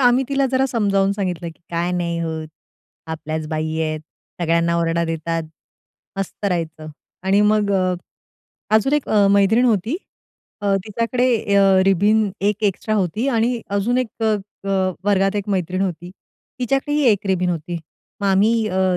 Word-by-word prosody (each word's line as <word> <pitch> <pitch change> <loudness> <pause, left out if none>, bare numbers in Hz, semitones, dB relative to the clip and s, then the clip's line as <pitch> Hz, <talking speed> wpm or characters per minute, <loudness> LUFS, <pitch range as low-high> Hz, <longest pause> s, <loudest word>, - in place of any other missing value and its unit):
आम्ही 250 +1 +4
तिला 275 -1 +2
जरा 260 +1 +3
समजावून 200 -5 +1
सांगितलं 180 -4 -3
की - - -34
"काय 170 +1 -1
नाही 170 -1 -1
होत, 160 -1 -4 0.6
आपल्याच 160 -1 -4
बाई 155 0 -2
आहेत, 155 -1 -1 0.4
सगळ्यांना 170 0 +2
ओरडा 170 0 +1
देतात, 165 0 -2 0.8
मस्त 195 +2 -5
राहायचं." 165 -4 -3 0.3
आणि 195 +2 +3
मग 210 -1 +3
अ, 185 -1 +2 0.8
अजून 220 +6 +3
1 295 -2 +1
अ, 205 -2 +4
मैत्रीण 200 +4 +4
होती. 230 - +1 0.9
तिच्याकडे 230 +4 0 0.3
अ, 200 - +6 0.2
रिबिन 205 +3 +3
1 205 +2 0
एक्स्ट्रा 210 +2 0
होती 210 +5 0
आणि 235 -1 +1 0.2
अजून 240 +5 +1
एक 255 - 0 0.2
अ, 220 -1 +3 0.3
अ, 190 -1 +1
वर्गात 195 0 +2
1 205 0 -3
मैत्रीण 185 -1 -1
होती. 175 -2 -3 0.5
तिच्याकडेही 275 +4 0
1 200 0 -3
रिबीन 180 -1 +1
होती. 170 0 -3 0.4
मग 200 - 0
आम्ही 215 +3 +3
अ, 185 -1 +1
195 Hz, 150 wpm, -21 LUFS, 170-220 Hz, 0.9 s, अ